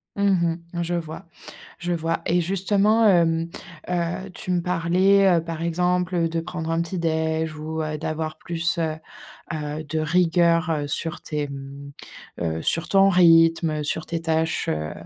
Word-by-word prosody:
Mmh 190 Hz, -5 st, +2 dB, 0.2 s
mh. 170 Hz, 0 st, -2 dB
Je 175 Hz, +1 st, -3 dB
vois. 160 Hz, -2 st, -5 dB, 0.5 s
Je 175 Hz, +1 st, -3 dB
vois 165 Hz, 0 st, -1 dB
et 175 Hz, +1 st, +2 dB
justement, 200 Hz, +5 st, +2 dB
hem, 165 Hz, -3 st, +3 dB, 0.4 s
heu, 180 Hz, +2 st, -2 dB
tu 185 Hz, -, -5 dB
me 175 Hz, -1 st, +1 dB
parlais, 180 Hz, +3 st, +3 dB
heu, -, -, -6 dB
par 165 Hz, -1 st, -5 dB
exemple, 180 Hz, +2 st, 0 dB
heu, 165 Hz, -1 st, +1 dB
de 165 Hz, 0 st, -2 dB
prendre 165 Hz, -1 st, -5 dB
un 165 Hz, +1 st, +1 dB
petit 175 Hz, +1 st, -5 dB
déj 160 Hz, -1 st, -1 dB
ou, 160 Hz, +1 st, -4 dB
heu, 155 Hz, 0 st, -3 dB
d'avoir, 155 Hz, +1 st, -3 dB
heu, -, -, -35 dB
plus, 170 Hz, +1 st, -1 dB
heu, 160 Hz, -2 st, 0 dB, 0.6 s
heu, 150 Hz, 0 st, -4 dB
de 155 Hz, +1 st, -3 dB
rigueur, 170 Hz, +1 st, +2 dB
heu, 150 Hz, -3 st, -1 dB
sur 160 Hz, +2 st, -3 dB
tes, 150 Hz, -1 st, -3 dB
mmh, 140 Hz, 0 st, -9 dB, 0.5 s
heu, 80 Hz, -1 st, -2 dB
sur 165 Hz, +1 st, 0 dB
ton 195 Hz, 0 st, +5 dB
rythme, 165 Hz, -3 st, +4 dB
sur 155 Hz, +2 st, -2 dB
tes 165 Hz, -1 st, -3 dB
tâches, 160 Hz, 0 st, 0 dB
heu, 75 Hz, 0 st, -2 dB
165 Hz, 170 wpm, -23 LUFS, 160-175 Hz, 0.6 s, ton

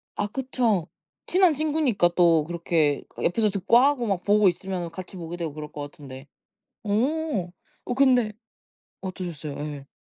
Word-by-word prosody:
아 205 Hz, -, -1 dB
그쵸. 235 Hz, -7 st, 0 dB, 0.4 s
친한 365 Hz, -3 st, +4 dB
친구니까 295 Hz, -, +2 dB
또 165 Hz, -4 st, +4 dB
그렇게 165 Hz, -4 st, 0 dB
그 -, -, -8 dB
옆에서 215 Hz, +4 st, +2 dB
듣고 200 Hz, +4 st, +3 dB
하고 270 Hz, -2 st, +3 dB
막 190 Hz, -3 st, -1 dB
보고 205 Hz, 0 st, +4 dB
있으면은 180 Hz, -1 st, -2 dB
같이 185 Hz, +2 st, -9 dB
보게 170 Hz, 0 st, -6 dB
되고 165 Hz, -4 st, -4 dB
그럴 150 Hz, 0 st, -8 dB
것 145 Hz, -, -7 dB
같은데. 140 Hz, -2 st, -10 dB, 0.6 s
어 230 Hz, -, 0 dB, 0.3 s
어 -, -, -2 dB
근데 250 Hz, -5 st, +4 dB, 0.7 s
어떠셨어요? 175 Hz, -6 st, -5 dB
예. 145 Hz, -2 st, -6 dB
190 Hz, 300 characters per minute, -25 LUFS, 165-245 Hz, 0.7 s, 친한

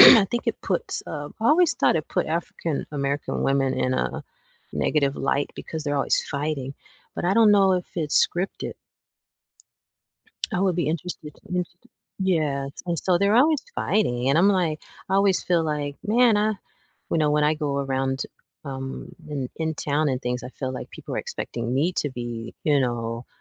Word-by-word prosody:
I 225 Hz, -5 st, +11 dB
think 240 Hz, +5 st, -3 dB
it -, -, -1 dB
puts, -, -, -2 dB
um 145 Hz, -1 st, -6 dB
I 225 Hz, -, +1 dB
always 335 Hz, +4 st, +5 dB
thought -, -, +3 dB
it 155 Hz, -, -3 dB
put -, -, 0 dB
African 165 Hz, -1 st, -2 dB
American 140 Hz, 0 st, -1 dB
women 135 Hz, -1 st, +2 dB
in 130 Hz, 0 st, 0 dB
a -, -, -1 dB, 0.5 s
negative 140 Hz, -3 st, +1 dB
light 140 Hz, +1 st, 0 dB
because 160 Hz, -2 st, -6 dB
they're 145 Hz, -1 st, 0 dB
always 140 Hz, -, +2 dB
fighting, 140 Hz, -2 st, -3 dB, 0.4 s
but -, -, -3 dB
I 185 Hz, +2 st, +3 dB
don't 220 Hz, -2 st, +6 dB
know 195 Hz, -2 st, +5 dB
if 180 Hz, -1 st, -2 dB
it's 155 Hz, -4 st, +3 dB
scripted. 180 Hz, +3 st, -3 dB, 1.8 s
I 180 Hz, -, 0 dB
would 185 Hz, -3 st, +2 dB
be 175 Hz, -, +1 dB
interested 160 Hz, -1 st, -4 dB, 0.2 s
interested 180 Hz, -1 st, -4 dB, 0.3 s
yeah, 155 Hz, -7 st, +1 dB, 0.2 s
and 170 Hz, -1 st, 0 dB
so 175 Hz, +2 st, +2 dB
they're 200 Hz, +2 st, +3 dB
always 290 Hz, +4 st, +4 dB
fighting, 130 Hz, -, +1 dB
and 140 Hz, +4 st, +4 dB
I'm 180 Hz, -, +6 dB
like 175 Hz, -6 st, +1 dB, 0.3 s
I 190 Hz, -, 0 dB
always 195 Hz, -1 st, +3 dB
feel 170 Hz, -2 st, +2 dB
like, 145 Hz, -2 st, -2 dB
"Man, 230 Hz, +1 st, +4 dB
I" 215 Hz, +1 st, +2 dB, 0.6 s
you -, -, +2 dB
know, 150 Hz, -1 st, +3 dB
when 150 Hz, 0 st, +3 dB
I 150 Hz, +1 st, +3 dB
go 145 Hz, -2 st, -1 dB
around, 135 Hz, -1 st, -1 dB, 0.4 s
um, 135 Hz, -1 st, -5 dB, 0.2 s
in 140 Hz, -4 st, -3 dB
in 160 Hz, -1 st, -1 dB
town 150 Hz, +1 st, 0 dB
and 130 Hz, -1 st, -1 dB
things 125 Hz, 0 st, -2 dB
I 125 Hz, -, -6 dB
feel 130 Hz, 0 st, -4 dB
like 130 Hz, -, -6 dB
people -, -, -7 dB
are -, -, 0 dB
expecting 120 Hz, +1 st, -4 dB
me 155 Hz, +7 st, +2 dB
to 145 Hz, -, -1 dB
be, 120 Hz, -2 st, -6 dB
you 145 Hz, -2 st, +4 dB
know, 120 Hz, -1 st, -2 dB
150 Hz, 180 wpm, -25 LUFS, 135-180 Hz, 1.8 s, I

